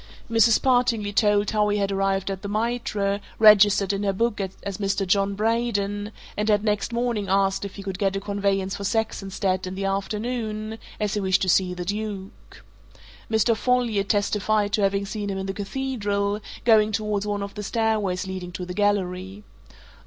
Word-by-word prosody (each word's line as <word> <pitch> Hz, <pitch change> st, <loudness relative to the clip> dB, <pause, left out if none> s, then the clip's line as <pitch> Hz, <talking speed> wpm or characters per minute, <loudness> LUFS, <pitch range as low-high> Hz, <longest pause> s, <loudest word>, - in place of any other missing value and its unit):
Mrs. 225 Hz, 0 st, +5 dB
Partingley 245 Hz, -5 st, +2 dB
told 205 Hz, -1 st, +3 dB
how 210 Hz, -1 st, +2 dB
he 205 Hz, -, +1 dB
had 200 Hz, -1 st, 0 dB
arrived 195 Hz, 0 st, 0 dB
at 190 Hz, -1 st, -5 dB
the 200 Hz, -, -5 dB
Mitre, 210 Hz, -2 st, -1 dB, 0.2 s
registered 205 Hz, -2 st, +6 dB
in 200 Hz, -, -2 dB
her 200 Hz, -1 st, +1 dB
book 220 Hz, +2 st, 0 dB, 0.2 s
as 200 Hz, -1 st, -5 dB
Mr. 195 Hz, -1 st, 0 dB
John 200 Hz, +1 st, +1 dB
Braden, 210 Hz, -2 st, -1 dB, 0.2 s
and 210 Hz, +1 st, -1 dB
had 205 Hz, -1 st, +3 dB
next 210 Hz, 0 st, 0 dB
morning 235 Hz, -4 st, -1 dB
asked 195 Hz, 0 st, +2 dB
if 200 Hz, -, -8 dB
he 200 Hz, -, -8 dB
could 190 Hz, -1 st, -5 dB
get 195 Hz, -2 st, +1 dB
a -, -, 0 dB
conveyance 195 Hz, -1 st, -1 dB
for 200 Hz, -, -6 dB
Saxonsteade 195 Hz, -3 st, -1 dB
in 185 Hz, -, -5 dB
the 195 Hz, +1 st, -3 dB
afternoon, 215 Hz, +2 st, -3 dB, 0.2 s
as 210 Hz, -2 st, -1 dB
he 210 Hz, -, 0 dB
wished 190 Hz, -1 st, +2 dB
to 185 Hz, -, 0 dB
see 180 Hz, 0 st, +2 dB
the 180 Hz, 0 st, -5 dB
Duke. 200 Hz, -1 st, -6 dB, 0.7 s
Mr. 220 Hz, +1 st, +3 dB
Folliot 235 Hz, -4 st, +1 dB
testified 205 Hz, 0 st, +1 dB
to 210 Hz, -, +2 dB
having 200 Hz, 0 st, +1 dB
seen 205 Hz, 0 st, -4 dB
him 195 Hz, -, -3 dB
in 190 Hz, -, -3 dB
the 195 Hz, -, -3 dB
Cathedral, 205 Hz, -2 st, -2 dB, 0.3 s
going 215 Hz, -2 st, +5 dB
towards 210 Hz, -1 st, -1 dB
one 205 Hz, -1 st, -2 dB
of 200 Hz, -, -7 dB
the 210 Hz, -, -6 dB
stairways 210 Hz, -4 st, 0 dB
leading 185 Hz, -1 st, -6 dB
to 180 Hz, +1 st, -5 dB
the 180 Hz, -, -6 dB
gallery. 190 Hz, 0 st, -1 dB
205 Hz, 180 wpm, -24 LUFS, 195-215 Hz, 0.7 s, registered